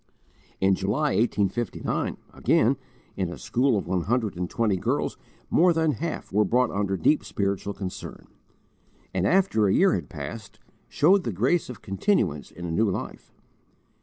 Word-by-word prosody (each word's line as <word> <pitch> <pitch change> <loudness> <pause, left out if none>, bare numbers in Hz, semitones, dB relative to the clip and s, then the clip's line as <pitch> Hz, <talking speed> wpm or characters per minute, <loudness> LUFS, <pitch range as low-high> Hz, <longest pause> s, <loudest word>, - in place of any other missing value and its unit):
In 95 0 +4
July, 105 +11 0
1859, 110 0 -1 0.2
again, 120 +5 +3 0.4
in 95 -3 -1
a 85 - -7
school 125 -1 +1
of 100 - -3
one 90 +1 0
hundred 110 +2 0
and 90 0 -3
twenty 110 -4 +1
girls - - -1 0.4
more 175 +1 +5
than 160 -1 +2
half 160 - -5
were 105 +2 +4
brought 125 +5 +2
under 100 -1 -1
deep 150 - +2
spiritual 100 -1 -2
concern; 95 -2 -7 0.9
and, 95 0 +1
after 180 - +3
a 95 - +2
year 195 0 +4
had 85 -6 -3
passed, 80 +9 -7 0.3
shewed 185 +6 +4
the 115 - -2
grace 125 - +1
of 125 - -9
continuance 95 - 0
in 85 +1 -9
a 85 - -3
new 105 +6 +2
life. 95 - -5
105 Hz, 160 wpm, -26 LUFS, 95-130 Hz, 0.9 s, more